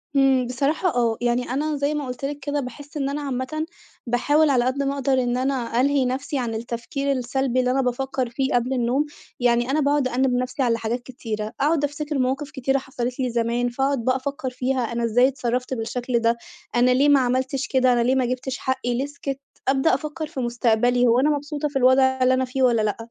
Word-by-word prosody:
إمم، 265 -2 +4
بصراحة 280 +8 0
آه، 230 -2 +1
يعني 240 +1 0
أنا 300 +4 -1
زي 285 +1 0
ما 295 -2 -2
قُلت 250 +2 -5
لِك 290 +1 -4
كده 285 +1 -2
باحِسّ 285 +4 -7
إن 275 -1 -1
أنا 290 +1 -3
عامةً 275 +3 -3 0.4
باحاول 290 +6 +3
على 250 -3 +3
قد 275 +2 0
ما 275 0 0
أقدِر 275 -1 0
إن 245 0 0
أنا 255 -2 0
ألهِي 280 -1 +2
نفسي 265 +2 -2
عن 230 -3 -2
التفكير 240 +5 -3
السلبي 255 0 0
اللي 250 0 +2
أنا 270 +1 +2
بافَكّر 255 0 -1
فيه 265 +2 -1
قبل 245 +2 +1
النوم، 255 +4 +1 0.3
يعني 240 +1 +2
أنا 305 - +2
باقعد 285 -2 +2
أأنّب 255 0 +1
نَفسي 255 +2 -1
على 230 -2 +2
حاجات 230 +2 -2
كتيرة، 220 -4 -5
أقعد 295 +1 +2
أفتكر 290 0 -2
مواقف 275 +4 -1
كتيرة 270 -1 0
حصلت 255 -1 -4
لي 255 -1 0
زمان، 235 +1 0
فأقعد 270 -1 -1
بقى 255 0 +3
أفكّر 265 0 -3
فيها 255 +1 -1
أنا 235 0 -2
إزاي 245 +3 +4
اتصرّفت 250 -1 -2
بالشكل 240 +1 -1
ده، 230 0 +2 0.4
أنا 245 +1 +4
ليه 275 +3 +4
ما 285 -1 +6
عملتش 260 +2 0
كده، 255 -2 +3
أنا 240 - +2
ليه 255 +2 +2
ما 260 - +2
جِبِتش 255 +2 -3
حقّي 260 -2 -1
ليه 260 +3 -1
سِكتّ، 280 -1 -5 0.3
أبدأ 270 +3 +3
أفكّر 305 +3 -3
في 275 - -7
مُستقبلي 245 0 +2
هو 235 +2 +4
أنا 295 +3 +3
مبسوطة 295 0 -2
في 290 - -11
الوضع 260 +1 +5 0.2
اللي 255 +1 +4
أنا 260 0 +1
فيه 260 +1 -2
والّا 235 -3 +4
لأ؟ 210 -2 0
260 Hz, 215 wpm, -23 LUFS, 245-275 Hz, 0.4 s, ما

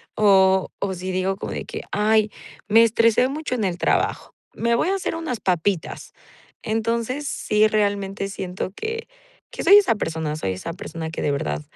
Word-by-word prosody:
O 190 -2 +4
o 195 -1 -2
si 185 +1 -5
digo 185 +1 0
como - - -5
de - - -5
que: - - -6
"Ay, 215 0 +2 0.4
me 225 +2 +7
estresé 230 +2 +3
mucho 290 -3 -3
en 220 - -2
el 180 -2 -2
trabajo, - - 0 0.2
me 235 0 +1
voy 320 - +1
a 390 - +1
hacer 375 - -3
unas 310 -9 -4
papitas". 180 0 -1 0.5
Entonces, 230 +5 -1
sí, 215 +1 +2
realmente 200 -2 -1
siento 185 -1 -5
que 455 +1 -4 0.6
soy 400 - +9
esa 370 - +4
persona 160 -5 -3
soy 95 -10 -2
esa 165 - -6
persona 165 -2 -6
que - - -5
de 145 - +1
verdad 75 - -2
205 Hz, 175 wpm, -22 LUFS, 185-230 Hz, 0.6 s, soy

